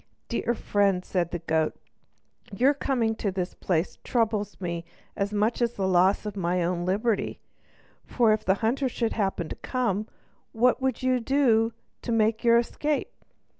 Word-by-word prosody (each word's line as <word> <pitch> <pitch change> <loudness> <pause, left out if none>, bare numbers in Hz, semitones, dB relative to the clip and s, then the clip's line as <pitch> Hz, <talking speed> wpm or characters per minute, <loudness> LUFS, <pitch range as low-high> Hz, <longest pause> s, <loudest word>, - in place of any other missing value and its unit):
"Dear 240 0 0
friend," 200 -4 +1
said 175 -3 -1
the 175 - -3
goat, 160 -1 0 0.8
"your 255 +8 +3
coming 250 -5 0
to 200 - -1
this 180 -1 -3
place 170 -1 -1
troubles 215 -4 -1
me 170 -2 -3 0.3
as 200 +1 -1
much 210 +4 0
as 235 0 +1
the 195 -4 -1
loss 185 +3 +3
of 210 -1 -4
my 180 -1 0
own 175 0 -1
liberty; 210 +3 0 0.6
for 230 -3 +3
if 215 - -1
the 190 - +3
hunter 260 +4 +1
should 230 -2 -1
happen 195 -5 -1
to - - -5
come, 220 -5 -1 0.5
what 245 +3 +3
would 260 -1 -1
you 255 -1 +2
do 230 -3 +2 0.3
to 240 - -4
make 220 0 +2
your 235 -1 +6
escape? 290 +5 -1
215 Hz, 165 wpm, -26 LUFS, 190-240 Hz, 0.8 s, your